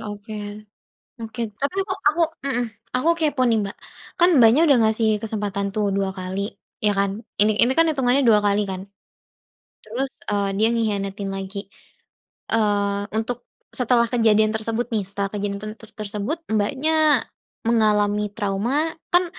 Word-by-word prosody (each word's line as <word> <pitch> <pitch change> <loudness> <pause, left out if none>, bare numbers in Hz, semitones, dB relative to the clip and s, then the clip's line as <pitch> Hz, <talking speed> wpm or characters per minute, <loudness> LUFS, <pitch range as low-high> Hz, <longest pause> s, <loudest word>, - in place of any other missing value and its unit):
oke, 205 +1 -7 0.8
oke. 225 +1 -7 0.2
Tapi 285 +7 -1
aku 375 -1 -3
aku 330 +3 +2 0.2
mhm, 245 -3 +1 0.3
aku 300 +6 +1
kepo, 295 -5 +1
nih, 225 -1 +3
Mbak, 195 - -8 0.4
kan, 350 +1 +6
Mbaknya 235 +5 +6
udah 275 -4 +5
ngasih 220 0 +2
kesempatan 205 -2 -2
tuh, 210 -1 +1
2 195 -1 0
kali. 185 +1 -4 0.4
ya 205 -1 +1
kan, 200 0 +2 0.3
ini 215 +1 +4
ini 250 +2 +4
kan, 330 - +6
itungannya 265 0 +2
2 215 -3 +6
kali 205 0 +2
kan, 190 -2 -4 1.0
terus, 250 +5 -2 0.2
eee, 200 -1 +1
dia 220 +2 +3
ngehianatin 200 -3 -1
lagi, 195 +1 -5 0.8
eee, 205 -2 +1 0.2
untuk 245 +2 -3 0.3
setelah 240 -1 +2
kejadian 220 -3 +4
tersebut 225 +2 -2
nih, 205 -3 0
setelah 200 0 -2
kejadian 200 -1 -3
ten 215 0 -5
ter 225 -1 -14
tersebut, 210 +8 -3
Mbaknya 285 +5 +2 0.4
mengalami 210 -2 +2
trauma 225 +10 0 0.2
kan, 355 +1 +5
215 Hz, 145 wpm, -23 LUFS, 200-245 Hz, 1.0 s, kan